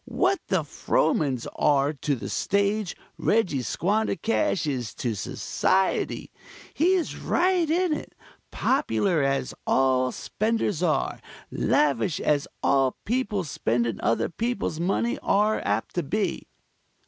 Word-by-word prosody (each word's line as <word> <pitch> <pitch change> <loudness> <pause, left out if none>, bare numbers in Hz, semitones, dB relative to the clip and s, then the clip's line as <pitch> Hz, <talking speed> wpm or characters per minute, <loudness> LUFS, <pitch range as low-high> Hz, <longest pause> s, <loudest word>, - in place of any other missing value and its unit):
What 380 0 +1
the 185 -4 +1
Frohmans 145 -3 0
are 145 0 +3
to 145 0 -1
the 120 - -6
stage, 200 0 0 0.2
Reggie 190 - +1
Squandercash 215 - 0
is 130 -6 -3
to 120 -3 -2
Society. 190 - 0 0.4
He's 355 +1 +1
right 355 -2 +1
in 345 0 +2
it; - - -6 0.3
popular 180 -6 +1
as 135 -1 0
all 130 -1 +3
spenders 215 -5 -1
are; 155 -6 0 0.3
lavish 145 +1 +1
as 145 -2 +1 0.2
all 135 -2 +2
people 215 -4 0
spending 120 - -1
other 115 +1 +1
people's 220 -4 -2
money 235 - 0
are 210 -1 +2
apt - - -1
to 175 - 0
be. 200 +7 -2
180 Hz, 115 wpm, -26 LUFS, 135-220 Hz, 0.4 s, are